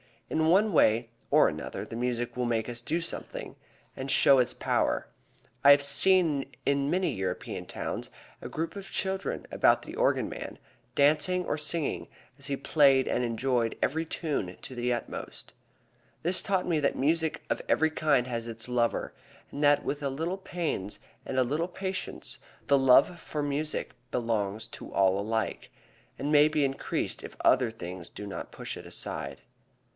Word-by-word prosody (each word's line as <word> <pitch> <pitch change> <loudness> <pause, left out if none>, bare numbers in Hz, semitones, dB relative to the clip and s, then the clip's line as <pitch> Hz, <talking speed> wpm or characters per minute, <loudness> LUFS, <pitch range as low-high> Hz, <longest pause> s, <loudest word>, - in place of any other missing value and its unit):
In 160 0 +2
one 200 +6 +4
way 115 - +4 0.2
or - - +6
another - - -4
the 115 - -7
music 120 -1 -2
will 125 0 -1
make 115 -2 0
us 120 0 -4
do 165 +7 -1
something 165 - -6 0.4
that 135 +1 -5
shows 135 -1 +6
its - - -6
power. - - 0 0.6
I 140 - +9
have 145 0 +7
seen 145 -1 +3 0.2
in 140 0 +2
many 185 +2 +1
European 95 -1 -4
towns - - -4 0.3
a - - -6
group 165 +4 -3
of 195 -1 -7
children 190 0 -2
about - - +4
the - - -8
organ - - +2
man, - - -7 0.4
dancing 155 +5 +3
or - - -1
singing 150 0 0 0.3
as 140 - -9
he 140 - 0
played 140 -1 +4
and - - 0
enjoying 120 0 0
every 160 +4 0
tune 145 - -3
to - - -7
the 125 0 -1
utmost. 120 - -5 0.7
This 175 +3 +2
taught 190 -2 0
me 165 -3 +2
that 140 - +1
music 160 +3 0
of - - 0
every 160 0 +3
kind 145 -5 +2
has 120 -2 -4
its 115 0 -4
lover, 120 -1 0 0.4
and 145 - -5
that 145 0 +5
with 145 - -3
a 140 - -1
little 165 +7 -2
pains 165 - -3 0.3
and 130 - -3
a 130 - +5
little 150 +7 -1
patience 190 +1 -4 0.3
the 140 - +5
love 135 +6 +5
for 150 -2 -4
music 145 +2 -2 0.2
belongs 110 -4 -1
to - - -9
all 95 0 +3
alike, 110 +1 -2 0.5
and 140 +3 -2
may 150 0 +7
be 155 -2 +2
increased 135 0 -2
if - - -9
other 125 -2 +4
things 90 -5 -8
do 105 - -8
not 100 - -6
push - - -6
it - - -10
aside. - - -5
140 Hz, 170 wpm, -29 LUFS, 120-160 Hz, 0.7 s, I